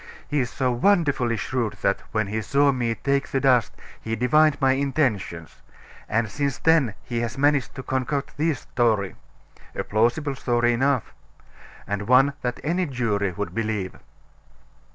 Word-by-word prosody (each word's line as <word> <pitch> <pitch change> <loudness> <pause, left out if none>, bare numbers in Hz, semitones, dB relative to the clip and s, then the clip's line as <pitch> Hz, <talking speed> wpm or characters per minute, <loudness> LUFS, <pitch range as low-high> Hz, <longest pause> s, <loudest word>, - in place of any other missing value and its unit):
He 145 - 0
is 125 -2 0
so 130 +2 -1
wonderfully 135 - +2
shrewd 120 -2 -2
that, 100 - +2
when 110 -1 0
he 110 +3 -3
saw 140 +5 +3
me 120 -3 -1
take 140 +5 0
the 135 - -1
dust, 130 -4 +2 0.3
he 115 0 -3
divined 150 +5 +3
my 135 -2 +3
intentions; 130 - -1 0.5
and 115 0 +1
since 140 +3 -2
then 155 -10 +3
he 120 -1 -3
has 115 0 -3
managed 145 -1 +1
to 130 - -6
concoct 130 +2 -2
this 155 -2 0
story 110 -6 0 0.6
a - - -2
plausible 120 +7 +1
story 120 -2 +1
enough 130 0 0 0.7
and 100 0 -3
one 135 +3 +5
that 125 0 -3
any 175 +3 0
jury 110 -7 -1
would 105 +3 -4
believe." 105 -4 -2
125 Hz, 155 wpm, -24 LUFS, 110-140 Hz, 0.7 s, one